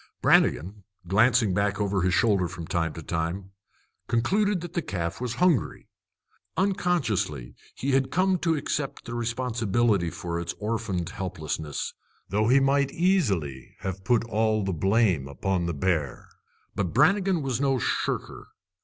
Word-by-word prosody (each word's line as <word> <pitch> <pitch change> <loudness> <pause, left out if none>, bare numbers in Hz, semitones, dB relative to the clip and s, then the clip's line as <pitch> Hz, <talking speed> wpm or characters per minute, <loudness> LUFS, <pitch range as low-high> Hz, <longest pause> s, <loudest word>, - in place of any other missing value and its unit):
Brannigan, 100 +6 +2 0.2
glancing 110 +1 +4
back 100 +1 0
over 100 -2 0
his 90 +1 +2
shoulder 100 -5 +3
from 85 -1 -7
time 80 -1 -1
to 80 - -8
time, 85 +4 -3 0.6
concluded 190 - +1
that 175 -1 -7
the 170 - 0
calf 85 - -4
was 120 -2 -2
hungry. 175 - +1 0.7
Unconsciously, 110 - 0 0.2
he 140 - -2
had 135 0 +2
come 185 0 +2
to 165 -1 +1
accept 145 -1 -3
the 120 - -6
responsibility 115 -5 0
for 85 0 -4
its 85 0 -4
orphaned 105 -5 -2
helplessness, 80 -7 -4 0.4
though 105 +2 +1
he 130 +3 +5
might 140 0 +2
easily 100 - 0
have 95 0 -4
put 120 +2 +2
all 110 -1 +1
the 95 -1 -1
blame 95 - +2
upon 90 +5 -1
the 85 - -1
bear. 75 -4 -1 0.5
But 95 -3 -2
Brannigan 185 - +3
was 130 -2 -1
no 135 -2 +2
shirker. 120 - -2
105 Hz, 145 wpm, -26 LUFS, 90-135 Hz, 0.7 s, he